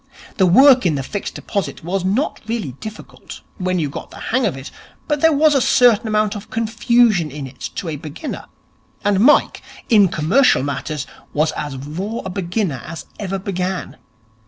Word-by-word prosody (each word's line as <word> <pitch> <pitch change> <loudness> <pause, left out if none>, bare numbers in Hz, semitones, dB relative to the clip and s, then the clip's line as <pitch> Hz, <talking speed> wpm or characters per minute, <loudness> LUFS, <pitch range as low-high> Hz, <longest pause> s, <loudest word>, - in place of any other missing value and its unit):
The 190 - +4
work 260 +7 +7
in 170 -5 +2
the 135 - -2
Fixed 200 +8 -5
Deposits 200 -6 -4
was 185 +2 -2
not 210 +11 -1
really 225 - -3
difficult, 215 -1 -10 0.2
when 185 0 0
you 160 -4 0
got 140 - -7
the - - -13 0.2
hang 255 -2 +3
of 165 - -3
it, 135 +2 -9 0.4
but 295 -2 -1
there 320 - +5
was 305 +1 +4
a 275 - +3
certain 235 -3 +4
amount 215 0 +1
of 205 0 -8
confusion 225 -5 +2
in 145 0 -7
it 130 0 -7
to 180 - -4
a 155 -2 -3
beginner; 155 - -7 0.6
and 205 -2 +3
Mike, 265 +8 +4 0.3
in 210 -5 +6
commercial 165 - +3
matters, 145 +1 -3 0.3
was 155 +2 +1
as 145 -2 -5
raw 180 - -5
a 190 - -4
beginner 180 - -2
as 165 0 -8
ever 195 -2 -3
began. 185 -1 -4
195 Hz, 180 wpm, -19 LUFS, 155-225 Hz, 0.6 s, work